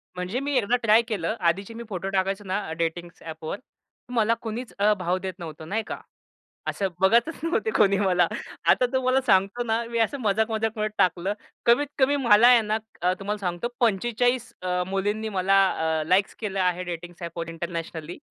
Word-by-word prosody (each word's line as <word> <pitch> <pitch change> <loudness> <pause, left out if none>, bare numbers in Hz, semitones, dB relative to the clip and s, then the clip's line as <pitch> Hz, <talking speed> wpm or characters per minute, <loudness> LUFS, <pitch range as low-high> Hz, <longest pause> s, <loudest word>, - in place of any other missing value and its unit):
म्हणजे 180 +7 -3
मी 285 +1 -2
एकदा 235 +1 +2
ट्राय 225 +1 +6
केलं. 210 -2 -2
आधीचे 190 +5 0
मी 235 - -7
फोटो 190 0 -3
टाकायचो 195 +1 -1
ना 190 -3 -3
डेटिंग्स 170 +1 -3
ॲपवर 160 +3 -6 0.5
मला 225 -1 +3
कुणीच 230 +2 -5
अ, 210 +1 +4
भाव 180 +1 0
देत 190 0 -5
नव्हतं 160 -1 -8
नाही 220 +2 -1
का. - - -4 0.7
असं 195 -1 -1
बघतच 235 +11 +4
नव्हते 230 -10 0
कोणी 200 -2 +4
मला. 190 -3 +3 0.4
आता 250 - +4
तो 260 - +2
मला 255 +1 +3
सांगतो 195 +3 +3
ना 225 0 0
मी 235 - -1
असं 230 +5 +1
मजाक-मजाकमध्ये 220 0 0
टाकलं. 180 +2 +2 0.3
कमीत 240 +5 +5
कमी 280 +2 +3
मला 235 -3 +6
आहे 245 -2 +7
ना 215 +1 0 0.2
अ, 180 +1 +3
तुम्हाला 210 +1 -3
सांगतो, 180 +5 -2
45 240 +3 +1
अ, 180 0 0
मुलींनी 205 +3 -1
मला 195 -1 +2 0.4
अ, 155 - -2
लाइक्स 190 +2 +3
केलेले 200 -3 -3
आहे 180 0 +1
डेटिंग्स 175 0 -7
ॲपवर 170 -1 -5
इंटरनॅशनली. 165 -1 -5
200 Hz, 175 wpm, -25 LUFS, 180-230 Hz, 0.7 s, आहे